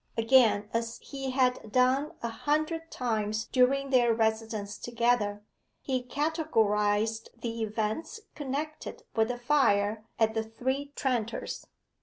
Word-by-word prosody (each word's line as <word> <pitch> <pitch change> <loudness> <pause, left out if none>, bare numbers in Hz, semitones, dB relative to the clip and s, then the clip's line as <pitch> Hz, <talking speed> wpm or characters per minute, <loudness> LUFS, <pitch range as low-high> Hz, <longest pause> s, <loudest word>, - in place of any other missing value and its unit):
Again, 225 -3 +4
as 230 0 -1
he 270 -2 -5
had 255 -4 +1
done 260 +6 +2
a - - 0
hundred 310 +6 -1
times 220 -4 -1
during 275 +2 +2
their 240 -3 +5
residence 220 -2 -1
together, 235 -4 0 0.4
he 260 -2 -1
categorized 225 -7 +1
the 230 -1 -4
events 220 - -2
connected 295 +2 -5
with 220 -1 +3
the 245 0 -3
fire 220 -5 +2
at 220 -1 +2
the 225 - 0
Three 260 +6 -3
Tranters. 240 -5 -2
235 Hz, 120 wpm, -29 LUFS, 220-270 Hz, 0.4 s, their